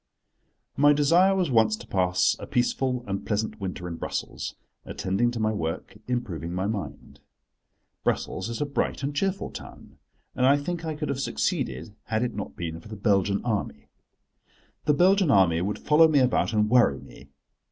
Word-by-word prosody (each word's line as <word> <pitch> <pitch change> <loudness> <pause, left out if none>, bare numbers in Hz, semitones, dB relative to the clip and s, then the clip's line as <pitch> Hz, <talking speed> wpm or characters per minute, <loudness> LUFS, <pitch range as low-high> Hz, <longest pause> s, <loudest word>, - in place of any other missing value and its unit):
MY 145 +1 +6
desire 170 +7 +4
was 180 -7 0
once 110 -2 +4
to - - -11
pass 90 -1 +2
a - - -8
peaceful 125 0 0
and 100 -1 -3
pleasant 110 0 -2
winter 90 -2 -4
in 85 -1 -5
Brussels, - - -4 0.3
attending 100 +6 -1
to 120 -1 -4
my 110 0 +1
work, 80 -3 -4
improving 95 - -3
my 95 +1 -1
mind. 105 -1 -5 0.8
Brussels 95 +4 -1
is 115 - -4
a 150 - 0
bright 140 0 -2
and 140 +1 -2
cheerful 195 +4 -1
town, - - -11 0.3
and 130 0 +2
I 140 +2 +5
think 165 +4 -4
I 160 -1 -3
could 150 0 -4
have 135 - -2
succeeded 70 - -2
had 110 +1 -1
it 125 - -2
not 100 -1 -6
been 85 -1 -5
for 85 - -14
the 110 - -7
Belgian 100 -1 +1
Army. 100 -11 -3 1.0
The 150 - +3
Belgian 190 +2 +4
Army 90 -8 +4
would 100 +3 -2
follow 155 +2 +5
me 155 -2 +2
about 125 -4 +2
and 105 -1 +2
worry 115 - +4
me. 70 - -15
110 Hz, 175 wpm, -26 LUFS, 95-140 Hz, 1.0 s, MY